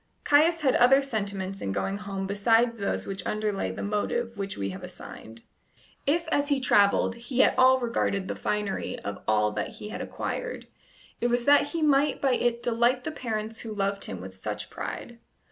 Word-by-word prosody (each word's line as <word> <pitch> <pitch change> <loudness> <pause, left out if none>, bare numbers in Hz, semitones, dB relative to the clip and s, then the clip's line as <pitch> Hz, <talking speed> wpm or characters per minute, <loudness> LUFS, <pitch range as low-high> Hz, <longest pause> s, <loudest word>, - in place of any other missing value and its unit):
Caius 320 +3 +4
had 270 -3 +3
other 255 +3 +6
sentiments 200 -6 -3
in 95 - -2
going 195 - -2
home 195 -2 -4
besides 225 +4 +2
those 200 - -2
which 195 -1 -5
underlay 210 - -1
the 95 - -5
motive 230 +3 -1
which 195 -1 -4
we 100 -1 -2
have 95 - -8
assigned. 115 +1 -10 0.6
If 330 +3 +2
as 285 -1 +1
he 285 -2 +2
travelled 205 -4 +3
he 245 +2 +1
at - - +4
all 260 0 +6
regarded 230 -5 -1
the - - -3
finery 210 -2 -2
of 100 0 -6
all 105 -1 +3
that 105 0 -4
he 210 - -8
had - - -5
acquired, - - -4 0.6
it 240 - +2
was 240 0 0
that 290 0 +6
he 325 +1 -2
might 290 -1 +3
by 270 -2 +2
it 240 -1 0
delight 240 +2 +2
the 315 - -3
parents 225 -5 -4
who 220 -2 -5
loved 200 0 -1
him 95 - -6
with 95 0 -9
such 105 +2 -5
pride. 240 -1 -6
220 Hz, 190 wpm, -27 LUFS, 195-255 Hz, 0.6 s, other